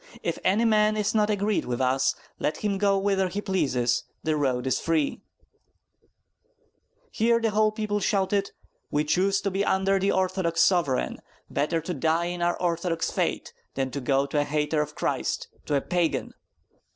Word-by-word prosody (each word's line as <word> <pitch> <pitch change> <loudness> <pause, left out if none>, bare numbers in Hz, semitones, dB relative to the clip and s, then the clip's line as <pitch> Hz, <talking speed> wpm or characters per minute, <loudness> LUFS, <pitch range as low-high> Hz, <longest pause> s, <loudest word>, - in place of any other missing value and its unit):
If - - -2
any 210 +5 +3
man 215 -1 +3
is 210 +1 0
not 210 -1 +2
agreed 205 0 0
with 120 -1 -3
us, 130 +1 +2 0.2
let 150 - -1
him 200 -2 0
go 200 -1 +3
whither 195 -1 +1
he 185 +3 -4
pleases; 135 - 0 0.2
the 155 -1 +1
road 130 -4 0
is 130 - +1
free 160 -3 0 0.8
" - - -43
Here 230 +1 +2
the 225 -1 0
whole 215 +1 +3
people 215 -1 -2
shouted: 200 0 +1 0.4
"We 150 - +1
choose 190 +6 +1
to 200 - -1
be 195 +2 0
under 195 0 +2
the 195 +1 +2
Orthodox 185 -3 +1
sovereign; 170 -9 +1 0.3
better 165 +3 0
to 180 - -4
die 160 +3 +1
in 175 0 -4
our 175 0 +1
Orthodox 170 -1 -1
faith - - -1 0.2
than 135 -1 -1
to 140 - -4
go 135 +2 +2
to 145 +1 -1
a - - +3
hater 150 +1 0
of 150 0 -5
Christ, - - -2 0.2
to 145 - +1
a 140 - +2
Pagan!" 175 0 -1
180 Hz, 175 wpm, -26 LUFS, 150-200 Hz, 0.8 s, any